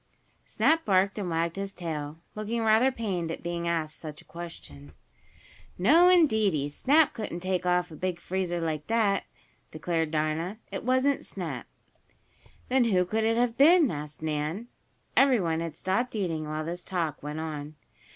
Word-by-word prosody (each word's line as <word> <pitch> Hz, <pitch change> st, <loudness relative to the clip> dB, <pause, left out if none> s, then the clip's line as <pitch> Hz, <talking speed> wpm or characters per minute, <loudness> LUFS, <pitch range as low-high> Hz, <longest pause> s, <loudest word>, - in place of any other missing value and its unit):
Snap 325 Hz, +1 st, +2 dB
barked 195 Hz, +1 st, +2 dB
and 190 Hz, -3 st, -3 dB
wagged 165 Hz, +1 st, -1 dB
his 195 Hz, 0 st, -4 dB
tail, 155 Hz, -3 st, -5 dB, 0.2 s
looking 220 Hz, +2 st, -2 dB
rather 225 Hz, +4 st, +4 dB
pained 195 Hz, -9 st, -3 dB
at 165 Hz, -, -5 dB
being 170 Hz, 0 st, -3 dB
asked 160 Hz, -2 st, -1 dB
such 155 Hz, -2 st, -8 dB
a -, -, -16 dB
question. 75 Hz, -, -10 dB, 0.8 s
"No, 315 Hz, -, +6 dB
indeedy, 220 Hz, -, +3 dB
Snap 290 Hz, -, +3 dB
couldn't 210 Hz, -6 st, -5 dB
take 185 Hz, -1 st, -1 dB
off 180 Hz, -1 st, +1 dB
a -, -, -8 dB
big 180 Hz, +1 st, -3 dB
freezer 180 Hz, -1 st, -2 dB
like 155 Hz, -2 st, -3 dB
dat," 220 Hz, -3 st, +2 dB, 0.4 s
declared 160 Hz, 0 st, -1 dB
Dinah. 155 Hz, +5 st, -1 dB
"It -, -, -4 dB
wasn't 260 Hz, +3 st, +2 dB
Snap." -, -, -6 dB, 1.0 s
"Then 255 Hz, -1 st, +3 dB
who 185 Hz, -5 st, +3 dB
could 220 Hz, +4 st, -1 dB
it 225 Hz, +1 st, +2 dB
have 240 Hz, -1 st, +1 dB
been?" 315 Hz, -1 st, +6 dB
asked 150 Hz, 0 st, -7 dB
Nan. 155 Hz, +9 st, -2 dB, 0.5 s
Everyone 205 Hz, -13 st, +3 dB
had 165 Hz, -2 st, -5 dB
stopped 225 Hz, +7 st, -1 dB
eating 165 Hz, -7 st, -2 dB
while 155 Hz, +1 st, -3 dB
this 175 Hz, +2 st, -5 dB
talk 170 Hz, -5 st, -2 dB
went 150 Hz, +2 st, -5 dB
on. 155 Hz, -1 st, -5 dB
180 Hz, 160 wpm, -28 LUFS, 160-225 Hz, 1.0 s, No